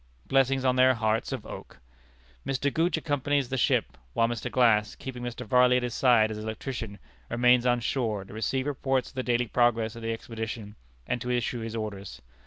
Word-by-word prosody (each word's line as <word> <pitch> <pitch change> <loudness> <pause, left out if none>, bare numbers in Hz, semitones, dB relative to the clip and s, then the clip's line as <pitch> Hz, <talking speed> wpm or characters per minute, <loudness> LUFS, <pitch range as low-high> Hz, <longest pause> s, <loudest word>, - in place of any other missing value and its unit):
Blessings 135 0 +2
on 130 0 +2
their 130 0 +5
hearts 110 0 0
of - - -4
oak! - - -9 0.7
Mr. 135 +1 -1
Gooch 165 +2 +1
accompanies 145 -2 0
the 130 - -2
ship, 65 - +1
while 115 - +3
Mr. 120 -1 -3
Glass, 110 -4 +3
keeping 130 -2 -7
Mr. 120 -1 -5
Varley 125 +3 +4
at 125 - -1
his 120 -2 -3
side 115 -4 +4
as 105 - -5
electrician, 110 0 -5 0.3
remains 125 +1 +4
on 120 -1 +2
shore, 110 -6 -1
to 95 - -13
receive 130 +4 -1
reports 135 -2 -1
of - - -19
the 130 - -2
daily 125 -1 +1
progress 115 -1 +1
of 115 - -9
the 115 0 -2
expedition, 110 -2 -6 0.3
and 125 - -2
to 125 - -4
issue 120 0 -1
his 115 0 -5
orders. 100 - -5
120 Hz, 195 wpm, -27 LUFS, 110-130 Hz, 0.7 s, their